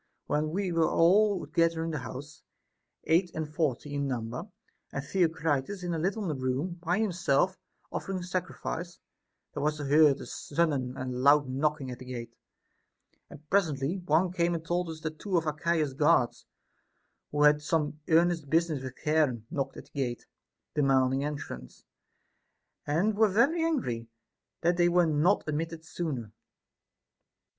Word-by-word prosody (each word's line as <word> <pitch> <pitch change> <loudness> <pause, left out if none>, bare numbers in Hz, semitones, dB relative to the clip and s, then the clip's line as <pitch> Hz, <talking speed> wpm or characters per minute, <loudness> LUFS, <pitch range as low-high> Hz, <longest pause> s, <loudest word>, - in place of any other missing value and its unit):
27. 150 +1 0
When - - -5
we 195 -2 -1
were 165 -1 +2
all 195 +3 +4
together 165 -1 +1
in 165 - -2
the 155 - -2
house 135 +5 -8 0.6
(eight 175 +3 +3
and 155 -1 -2
forty 150 -2 -2
in 140 -1 -1
number), 120 -2 -4 0.4
and 140 - -4
Theocritus 160 +1 0
in 175 -1 -2
a 165 - -1
little 195 +6 -1
room 150 +2 -2
by 175 +2 +1
himself 185 -4 +1 0.4
offering 190 -2 -3
sacrifice, 175 -1 -4 0.6
there - - -4
was 150 +1 0
heard 145 0 +5
on - - -11
a - - -8
sudden 140 -5 -1
a 130 - -4
loud 135 +3 +4
knocking 140 0 -1
at 125 - -8
the 130 - -10
gate; 120 -2 -6 1.0
and 150 +1 -13
presently 165 -3 +1
one 175 +1 +2
came 175 -1 +1
and 165 -1 -5
told 175 +1 -1
us 160 -1 -7
that 155 -1 -5
two 195 -4 0
of 165 - 0
Archias's 155 -1 0
guard, 145 -3 +4 1.0
who 145 0 +2
had 150 0 +6
some 150 -1 -1
earnest 165 -2 +3
busi 165 +2 +3
ness 140 - -4
with 130 -1 -7
Charon, 150 -8 +1
knocked 135 -2 -3
at - - -8
the - - -26
gate, 125 -4 -3 0.5
demanding 135 -1 +2
entrance, 140 - -6 1.0
and 175 +9 +2
were 220 +1 +5
very 275 - +3
angry 125 - -1 0.5
that 175 +1 +2
they 175 -1 +4
were 175 0 +4
not 160 +5 +2
admitted 160 +1 -3
sooner. 140 - -4
155 Hz, 155 wpm, -29 LUFS, 140-175 Hz, 1.0 s, had